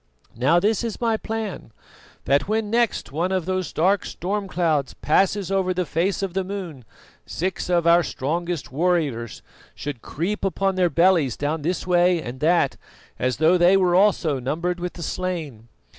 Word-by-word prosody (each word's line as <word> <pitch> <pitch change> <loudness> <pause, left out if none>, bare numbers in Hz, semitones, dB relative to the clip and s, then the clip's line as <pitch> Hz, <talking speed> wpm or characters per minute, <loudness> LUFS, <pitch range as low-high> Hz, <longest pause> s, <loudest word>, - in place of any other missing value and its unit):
Now, 135 +9 +3
this 210 +5 +1
is 230 -2 -4
my 230 -2 +1
plan: 220 - -5 0.5
that 140 +5 +2
when 215 0 -1
next 235 - 0
one 170 +6 -1
of 185 -3 0
those 185 -1 -2
dark 190 +5 +2
storm 200 +2 -3
clouds 160 -7 0
passes 195 +4 +1
over 185 -1 +1
the 180 0 0
face 180 +6 -1
of 190 -3 -3
the 190 0 0
moon 180 - -7 0.4
six 185 +1 -3
of 175 -1 +2
the 170 +1 +5
strongest 170 0 -3
of - - -20
our 140 - -7
warriors 150 - 0 0.3
should 145 -5 -6
creep 190 +8 -3
upon 195 0 0
their 185 -2 +2
bellies 170 -5 +3
down 150 +2 -2
this 170 +3 -2
way 175 -1 +3
and 130 -3 -7
that, 170 +4 +2 0.4
as 130 0 0
though 165 +3 +4
they 180 +3 +6
were 180 -2 +2
also 180 -7 +3
numbered 165 +8 -2
with 175 0 -4
the 170 - -8
slain. 160 -12 -4
175 Hz, 175 wpm, -23 LUFS, 155-190 Hz, 0.5 s, they